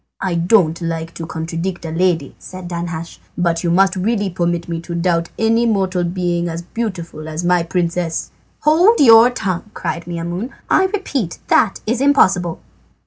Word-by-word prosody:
"I 190 Hz, -2 st, -1 dB
don't 170 Hz, -1 st, +2 dB
like 165 Hz, 0 st, -3 dB
to 165 Hz, -, -7 dB
contradict 165 Hz, +2 st, -4 dB
a 160 Hz, -, -4 dB
lady," 165 Hz, -4 st, 0 dB
said 185 Hz, -1 st, -9 dB
Danhasch, 170 Hz, -1 st, -5 dB, 0.2 s
"but 170 Hz, -1 st, 0 dB
you 170 Hz, -, +1 dB
must 190 Hz, +3 st, +3 dB
really 200 Hz, +1 st, 0 dB
permit 170 Hz, -1 st, -1 dB
me 165 Hz, -1 st, -3 dB
to 170 Hz, 0 st, -6 dB
doubt 170 Hz, -1 st, 0 dB
any 230 Hz, +1 st, +2 dB
mortal 190 Hz, -4 st, 0 dB
being 175 Hz, -1 st, -1 dB
as 165 Hz, +1 st, -5 dB
beautiful 175 Hz, -7 st, -5 dB
as 155 Hz, +2 st, -4 dB
my 175 Hz, 0 st, +3 dB
princess." 170 Hz, 0 st, -2 dB, 0.3 s
"Hold 350 Hz, +10 st, +4 dB
your 230 Hz, -3 st, +8 dB
tongue," 195 Hz, -5 st, -3 dB
cried 170 Hz, -, -4 dB
Maimoune. 175 Hz, +6 st, -4 dB, 0.2 s
"I 380 Hz, -, +5 dB
repeat 295 Hz, -, -2 dB
that 205 Hz, -, +3 dB
is 235 Hz, +3 st, -1 dB
impossible." 185 Hz, -, +3 dB
175 Hz, 160 wpm, -18 LUFS, 170-200 Hz, 0.3 s, your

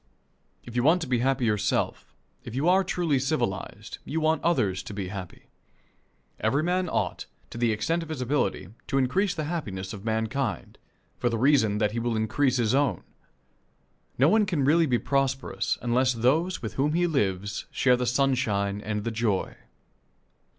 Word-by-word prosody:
If 120 Hz, -, -10 dB
you 120 Hz, -, +2 dB
want 160 Hz, +8 st, +4 dB
to -, -, -6 dB
be 125 Hz, -2 st, +1 dB
happy 130 Hz, 0 st, +1 dB
yourself, 105 Hz, -2 st, -1 dB, 0.3 s
if 120 Hz, -, -8 dB
you 140 Hz, +5 st, 0 dB
are 190 Hz, +2 st, +5 dB
truly 170 Hz, -6 st, 0 dB
civilized, 120 Hz, -6 st, -3 dB
you 160 Hz, -, -2 dB
want 160 Hz, 0 st, +1 dB
others 100 Hz, -, +1 dB
to 100 Hz, -, -8 dB
be 95 Hz, -3 st, -4 dB
happy. 95 Hz, -3 st, -8 dB, 1.0 s
Every 135 Hz, +8 st, +1 dB
man 180 Hz, +1 st, 0 dB
ought, -, -, -2 dB, 0.2 s
to 115 Hz, -, -7 dB
the 120 Hz, -1 st, +2 dB
extent 115 Hz, +11 st, 0 dB
of 165 Hz, -, -8 dB
his 155 Hz, -4 st, -4 dB
ability, 125 Hz, -, -1 dB, 0.2 s
to 135 Hz, -, 0 dB
increase 180 Hz, +10 st, +1 dB
the 155 Hz, -, -2 dB
happiness 105 Hz, -, -4 dB
of 100 Hz, -2 st, -8 dB
mankind, 110 Hz, +2 st, -2 dB, 0.4 s
for 120 Hz, -, +1 dB
the 115 Hz, -, -1 dB
reason 115 Hz, -5 st, +3 dB
that 105 Hz, -1 st, +1 dB
that 115 Hz, -, -2 dB
will 120 Hz, -1 st, -1 dB
increase 120 Hz, +5 st, +1 dB
his 115 Hz, -2 st, +1 dB
own. 140 Hz, -1 st, +1 dB, 1.1 s
No 135 Hz, -, +5 dB
one 210 Hz, +4 st, +4 dB
can 170 Hz, -8 st, 0 dB
be -, -, +2 dB
really 155 Hz, -6 st, +3 dB
prosperous 135 Hz, +1 st, -1 dB
unless 125 Hz, +2 st, +2 dB
those 145 Hz, +9 st, +1 dB
with 110 Hz, -, -4 dB
whom 150 Hz, +2 st, +1 dB
he 175 Hz, +1 st, +2 dB
lives 100 Hz, -, -1 dB
share 125 Hz, -2 st, +3 dB
the 125 Hz, 0 st, -2 dB
sunshine 120 Hz, -7 st, +1 dB
and 105 Hz, -1 st, -3 dB
the 115 Hz, -, -2 dB
joy. 110 Hz, -4 st, -1 dB
125 Hz, 175 wpm, -26 LUFS, 110-150 Hz, 1.1 s, are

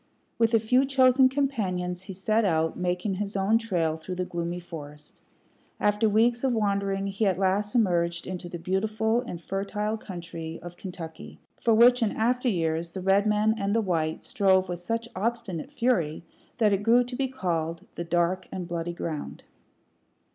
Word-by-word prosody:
With 230 Hz, 0 st, +4 dB
a -, -, +5 dB
few 250 Hz, +5 st, +3 dB
chosen 260 Hz, -1 st, +5 dB
companions 190 Hz, -11 st, -1 dB
he 190 Hz, +1 st, -8 dB
set 215 Hz, +4 st, +1 dB
out, 160 Hz, -4 st, +1 dB
making 180 Hz, +2 st, -1 dB
his 200 Hz, +2 st, -4 dB
own 200 Hz, +4 st, +3 dB
trail 170 Hz, -8 st, 0 dB
through 180 Hz, +3 st, -6 dB
the 180 Hz, 0 st, -2 dB
gloomy 170 Hz, 0 st, -3 dB
forest. 150 Hz, -4 st, -10 dB, 0.6 s
After 210 Hz, +1 st, +2 dB
weeks 235 Hz, +3 st, +3 dB
of 265 Hz, -2 st, +2 dB
wandering, 200 Hz, -2 st, 0 dB
he 200 Hz, +2 st, 0 dB
at 185 Hz, -2 st, +1 dB
last 195 Hz, +3 st, 0 dB
emerged 170 Hz, -6 st, +1 dB
into 180 Hz, -1 st, -5 dB
the 175 Hz, -, -5 dB
beautiful 215 Hz, +6 st, 0 dB
and 205 Hz, -9 st, -7 dB
fertile 205 Hz, +4 st, -2 dB
country 170 Hz, -5 st, -7 dB
of 175 Hz, 0 st, -8 dB
Kentucky, 175 Hz, -4 st, -9 dB, 0.2 s
for 230 Hz, -2 st, +4 dB
which, 245 Hz, +2 st, +6 dB
in 220 Hz, -3 st, +2 dB
after 245 Hz, +3 st, +1 dB
years, 165 Hz, -3 st, -1 dB
the 190 Hz, +2 st, -6 dB
red 195 Hz, +3 st, +3 dB
men 210 Hz, +1 st, +3 dB
and 200 Hz, +1 st, 0 dB
the -, -, +4 dB
white 160 Hz, -5 st, -1 dB
strove 190 Hz, -2 st, +2 dB
with 175 Hz, -1 st, -3 dB
such 230 Hz, +6 st, -3 dB
obstinate 225 Hz, -, -3 dB
fury 230 Hz, -, 0 dB, 0.3 s
that 215 Hz, -4 st, +3 dB
it 195 Hz, -, +1 dB
grew 235 Hz, +3 st, +5 dB
to 245 Hz, +1 st, -7 dB
be 270 Hz, +1 st, 0 dB
called 170 Hz, -9 st, -3 dB
"the 170 Hz, -, -4 dB
dark 175 Hz, +2 st, 0 dB
and 180 Hz, -2 st, -5 dB
bloody 170 Hz, 0 st, -3 dB
ground." 160 Hz, -3 st, -5 dB
195 Hz, 175 wpm, -27 LUFS, 175-225 Hz, 0.6 s, which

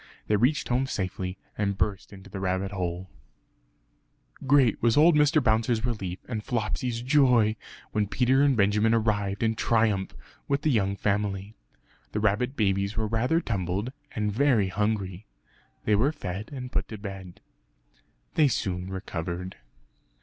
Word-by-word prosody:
They 105 Hz, -, +2 dB
reached 130 Hz, +7 st, +1 dB
home 125 Hz, +2 st, +1 dB
safely 95 Hz, -3 st, -3 dB, 0.2 s
and 100 Hz, -1 st, -1 dB
burst 100 Hz, -2 st, -2 dB
into 100 Hz, -1 st, -12 dB
the 95 Hz, 0 st, -7 dB
rabbit 95 Hz, +1 st, -1 dB
hole. 90 Hz, -1 st, -4 dB, 1.4 s
Great 130 Hz, -5 st, +4 dB
was 115 Hz, +1 st, +3 dB
old 165 Hz, +3 st, +7 dB
Mr. 150 Hz, 0 st, +4 dB
Bouncer's 110 Hz, 0 st, +2 dB
relief 100 Hz, -7 st, -3 dB
and 110 Hz, -4 st, -4 dB
Flopsy's 115 Hz, +1 st, -2 dB
joy 125 Hz, -6 st, +4 dB, 0.4 s
when 105 Hz, -2 st, 0 dB
Peter 130 Hz, +5 st, +2 dB
and 140 Hz, -3 st, +3 dB
Benjamin 105 Hz, +2 st, +3 dB
arrived 105 Hz, -2 st, 0 dB
in 110 Hz, 0 st, +2 dB
triumph 110 Hz, -4 st, +1 dB, 0.3 s
with 140 Hz, +1 st, 0 dB
the 155 Hz, -, +3 dB
young 100 Hz, -5 st, +1 dB
family. 100 Hz, 0 st, -1 dB, 0.6 s
The 105 Hz, -, 0 dB
rabbit 110 Hz, +6 st, +1 dB
babies 100 Hz, -1 st, 0 dB
were 110 Hz, -, +1 dB
rather 115 Hz, +9 st, +1 dB
tumbled 100 Hz, -, -2 dB, 0.2 s
and 105 Hz, -1 st, -1 dB
very 120 Hz, -5 st, +3 dB
hungry; 105 Hz, -1 st, -2 dB, 0.6 s
they 105 Hz, -, +3 dB
were 120 Hz, +8 st, +3 dB
fed 100 Hz, -, -6 dB
and 125 Hz, -3 st, -6 dB
put -, -, -1 dB
to 110 Hz, -, -7 dB
bed. 95 Hz, -3 st, -8 dB, 0.9 s
They 155 Hz, -2 st, +4 dB
soon 95 Hz, -7 st, -2 dB
recovered. 90 Hz, -1 st, -5 dB
105 Hz, 145 wpm, -27 LUFS, 95-120 Hz, 1.4 s, old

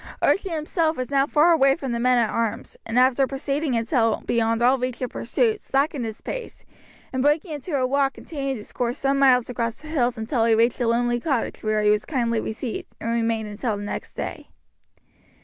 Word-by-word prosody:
Archie 390 Hz, 0 st, +2 dB
himself 320 Hz, 0 st, -1 dB
was 255 Hz, +2 st, -4 dB
now 275 Hz, 0 st, +3 dB
far 310 Hz, +4 st, +4 dB
away 275 Hz, -4 st, +4 dB
from 270 Hz, -6 st, -5 dB
the 235 Hz, -, -1 dB
men 250 Hz, +1 st, +3 dB
at 230 Hz, -3 st, +2 dB
arms, 230 Hz, -2 st, -2 dB
and 225 Hz, +2 st, -2 dB
after 260 Hz, +1 st, +4 dB
proceeding 275 Hz, 0 st, -2 dB
until 230 Hz, -1 st, +1 dB
beyond 230 Hz, 0 st, +1 dB
all 255 Hz, +2 st, +4 dB
reach 250 Hz, -1 st, -3 dB
of 250 Hz, -, -3 dB
pursuit, 440 Hz, -3 st, 0 dB
slackened 275 Hz, -2 st, 0 dB
his 220 Hz, -1 st, -7 dB
pace, -, -, -7 dB, 0.5 s
and 260 Hz, -, 0 dB
breaking 300 Hz, +5 st, +1 dB
into 295 Hz, +2 st, -4 dB
a 255 Hz, -, +1 dB
walk 275 Hz, +1 st, +1 dB
continued 275 Hz, -4 st, -4 dB
his 210 Hz, -, -12 dB
course 245 Hz, 0 st, -2 dB
some 275 Hz, 0 st, +1 dB
miles 255 Hz, -3 st, +5 dB
across 235 Hz, -2 st, -2 dB
the 310 Hz, -, -14 dB
hills 250 Hz, -6 st, 0 dB
until 225 Hz, +1 st, 0 dB
he 230 Hz, -1 st, +4 dB
reached 230 Hz, +3 st, +2 dB
a 240 Hz, -, +1 dB
lonely 240 Hz, +1 st, +1 dB
cottage 270 Hz, -3 st, -2 dB
where 215 Hz, -1 st, 0 dB
he 210 Hz, -, +5 dB
was 210 Hz, 0 st, +1 dB
kindly 235 Hz, -6 st, 0 dB
received, 220 Hz, +2 st, -5 dB
and 230 Hz, -, -3 dB
remained 225 Hz, -2 st, 0 dB
until 210 Hz, +1 st, -3 dB
next 205 Hz, 0 st, -6 dB
day. -, -, -6 dB
250 Hz, 200 wpm, -24 LUFS, 230-275 Hz, 0.5 s, miles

